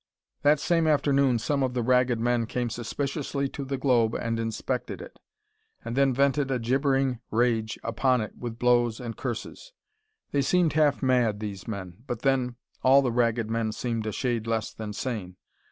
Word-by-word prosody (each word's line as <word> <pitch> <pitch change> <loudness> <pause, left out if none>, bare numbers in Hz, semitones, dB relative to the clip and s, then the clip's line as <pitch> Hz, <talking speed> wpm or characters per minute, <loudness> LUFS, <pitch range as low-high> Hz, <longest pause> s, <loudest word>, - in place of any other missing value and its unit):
That 145 +1 +4
same 165 +1 +2
afternoon 140 -4 +3
some 140 +5 -1
of 130 -1 0
the 120 - 0
Ragged 125 -1 +3
Men 120 -1 +1
came 120 0 -2
suspiciously 140 +4 -2
to 140 - -6
the 135 0 -3
globe 120 -4 +2
and 115 0 -2
inspected 115 +3 -3
it, - - -11 0.7
and 115 - -4
then 135 0 +4
vented 140 +1 +2
a 130 - +1
gibbering 135 +1 +1
rage 115 -1 +1
upon 125 +3 +1
it 110 - -6
with 120 -2 -6
blows 120 -2 +2
and 115 -3 -5
curses. 130 - -6 0.6
They 140 - +2
seemed 170 +4 +2
half 150 -2 +2
mad, 120 -5 +2
these 100 -3 -6
men. 95 -5 -6
But 120 -1 -4
then, 130 -3 +1 0.3
all 135 +2 +6
the 125 - 0
Ragged 115 -2 +1
Men 115 -1 -1
seemed 115 -1 -3
a - - -1
shade 120 -1 -2
less 115 -2 -1
than 110 -1 -6
sane. 105 -6 -4
125 Hz, 175 wpm, -27 LUFS, 115-135 Hz, 0.7 s, all